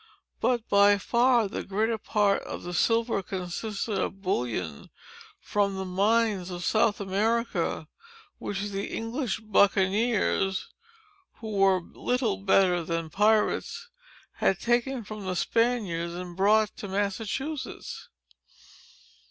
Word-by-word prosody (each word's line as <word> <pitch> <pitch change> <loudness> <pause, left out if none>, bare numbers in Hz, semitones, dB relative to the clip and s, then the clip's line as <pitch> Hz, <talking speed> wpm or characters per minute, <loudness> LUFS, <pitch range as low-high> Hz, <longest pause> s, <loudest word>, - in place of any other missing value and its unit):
But 240 -3 0
by 200 0 +5
far 235 +2 +3
the - - -4
greater 220 +3 -1
part 200 -1 +1
of - - -7
the 175 - -6
silver 225 +4 +2
consisted 195 +3 -4
of 195 +1 -3
bullion 110 - -2 0.5
from 200 -1 0
the 190 - -3
mines 200 0 +1
of 175 -1 -5
South 220 -1 +2
America, 200 -4 -1 0.5
which 205 +1 -3
the 195 0 -3
English 225 -1 -3
buccaniers—(who 220 - 0
were 195 -2 +3
little 235 +3 -1
better 190 -3 +3
than 165 -1 -3
pirates)—had 220 - 0
taken 240 +1 0
from 210 -1 -8
the 185 - -1
Spaniards, 195 -7 0
and 180 -1 -7
brought 210 +3 +3
to 210 - -6
Massachusetts. 210 +9 -4
205 Hz, 110 wpm, -27 LUFS, 190-230 Hz, 0.5 s, by